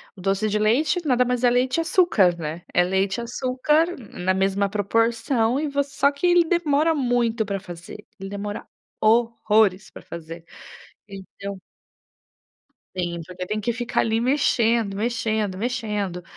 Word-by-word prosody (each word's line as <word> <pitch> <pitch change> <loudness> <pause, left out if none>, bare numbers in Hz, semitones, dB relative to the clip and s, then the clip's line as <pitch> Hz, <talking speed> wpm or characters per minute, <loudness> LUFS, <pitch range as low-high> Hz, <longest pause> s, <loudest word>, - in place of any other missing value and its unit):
O 185 - -12
doce 195 +3 0
de 210 - 0
leite 270 - +2
nada 250 -3 +3
mais 250 0 -1
é 245 - +6
leite 255 +3 +1
e - - +2
açúcar, 230 - +3
né, 160 +1 -5
é 180 - +4
leite 190 +3 0
açúcar 260 +6 +1
na 190 -6 -3
mesma 195 +1 +1
proporção 230 +4 +1
e 310 - -1
você 280 0 -1
só 280 - +4
que 280 +5 -4
ele 350 -1 +5
demora 320 -2 +2
muito 240 -5 0
pra 200 -1 -3
fazer, 175 +3 -10
ele 195 0 -6
demora 205 +1 -5 0.3
horrores 220 -3 +2
pra - - -11
fazer 165 0 -9 0.6
então. 195 0 -8 1.4
Sim, 175 -2 -3
porque 180 0 -7
tem 215 +3 -2
que 235 +3 -1
ficar 240 0 -1
ali 225 0 +1
mexendo, 235 -5 +2
mexendo, 220 -3 -1
mexendo. 210 -6 -3
220 Hz, 150 wpm, -23 LUFS, 195-250 Hz, 1.4 s, é